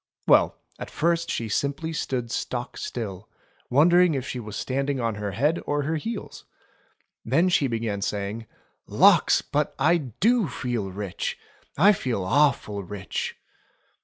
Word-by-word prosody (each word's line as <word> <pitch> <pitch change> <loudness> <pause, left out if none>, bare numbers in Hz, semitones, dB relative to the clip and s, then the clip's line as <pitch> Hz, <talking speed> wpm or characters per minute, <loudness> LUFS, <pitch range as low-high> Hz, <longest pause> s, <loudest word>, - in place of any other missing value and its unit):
Well, - - +4 0.2
at - - -6
first 170 +1 0
she 115 - -2
simply 140 +8 -2
stood 125 -6 -3
stock 120 0 -3
still, 105 -4 -6 0.4
wondering 170 +4 +5
if 130 -1 -3
she 125 - -4
was 105 -3 -7
standing 135 +3 -1
on 115 -2 0
her 105 -1 -4
head 145 - +1
or 145 0 0
her 160 +3 -1
heels. 225 +7 -6 0.8
Then 165 +10 +2
she 150 -6 +2
began 115 -4 -2
saying: 105 +3 -3 0.4
"Lawks! - - +5
But - - -1
I 175 - +4
do 190 - +1
feel 120 -6 -3
rich. 95 -1 -4 0.4
I 200 +8 +6
feel 125 - -2
awful 120 -3 +2
rich 100 0 -5
125 Hz, 140 wpm, -25 LUFS, 105-155 Hz, 0.8 s, I